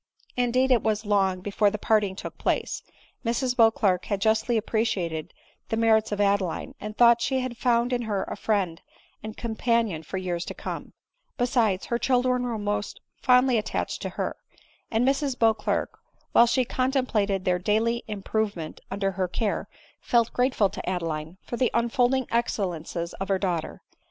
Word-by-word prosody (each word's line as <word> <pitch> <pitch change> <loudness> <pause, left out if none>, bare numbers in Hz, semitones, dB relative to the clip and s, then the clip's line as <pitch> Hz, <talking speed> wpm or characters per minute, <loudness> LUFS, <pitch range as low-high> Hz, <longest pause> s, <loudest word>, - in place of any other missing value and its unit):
Indeed 250 +2 +2
it 245 - +5
was 215 0 -1
long 195 -3 +2
before 205 +2 +2
the 210 - -4
parting 210 -2 +1
took - - -8
place, - - -1 0.4
Mrs 245 +2 0
Beauclerc 225 -6 +3
had 200 -2 -1
jusdy 220 +3 +2
appreciated 205 -8 -1 0.4
the 225 - 0
merits 220 -1 +3
of 205 - -2
Adeline, 200 -4 0
and 210 +1 -6
thought 235 -1 +6
she 260 +1 +1
had 255 -1 -4
found 240 +1 +1
in 245 - 0
her 200 -2 0
a - - -5
friend 195 -6 -1 0.4
and 215 0 -7
companion 230 -6 0
for 175 +4 -6
years 175 -2 -2
to - - -6
come; - - -6 0.4
besides, 235 -7 +1
her 235 - -1
children 250 0 +2
were 240 -2 -2
most 205 0 -3 0.2
fondly 250 -1 +4
attached 210 - -3
to - - -3
her; - - -2 0.5
and 230 +3 +1
Mrs 275 -1 +1
Beauclerc, 220 -2 +1 0.4
while 235 - +6
she 245 +2 +2
contemplated 235 -7 0
their 180 -1 +2
daily 225 +5 +1
improvement 205 -5 -3
under 195 0 -1
her 185 -1 -1
care, 200 +4 -2 0.3
felt 235 -2 +1
grateful 245 -6 +2
to - - -5
Adeline 165 -2 -3
for 240 - -5
tbe 255 - +2
unfolding 245 +2 +2
excellencies 175 -7 -2
of 195 - -3
her 195 - +2
daughters. 180 -4 -2
220 Hz, 160 wpm, -26 LUFS, 195-240 Hz, 0.5 s, thought